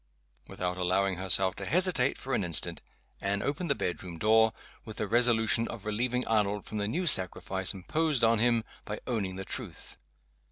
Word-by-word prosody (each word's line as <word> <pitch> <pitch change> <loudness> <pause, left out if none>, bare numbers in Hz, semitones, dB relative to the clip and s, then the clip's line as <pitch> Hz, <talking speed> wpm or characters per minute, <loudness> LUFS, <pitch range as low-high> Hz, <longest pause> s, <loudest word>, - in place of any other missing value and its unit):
Without 90 0 -4
allowing 95 +1 0
herself 95 0 +3
to - - -7
hesitate 170 -6 +2
for 135 - -6
an 105 - 0
instant, 85 -3 0 0.4
Anne 100 +1 -1
opened 150 +4 -3
the 140 - +2
bedroom 90 -4 -5
door 110 +4 +3 0.3
with 110 -1 -10
the 105 - -2
resolution 115 0 +3
of 115 -4 -9
relieving 125 +4 -2
Arnold 105 -2 0
from 110 - -5
the 100 - -1
new 175 - -2
sacrifice 95 - +3
imposed 145 - 0
on 115 -1 +4
him 115 -1 +2 0.2
by 105 0 -6
owning 100 -6 -3
the 95 0 -7
truth. - - -7
110 Hz, 170 wpm, -29 LUFS, 95-120 Hz, 0.4 s, on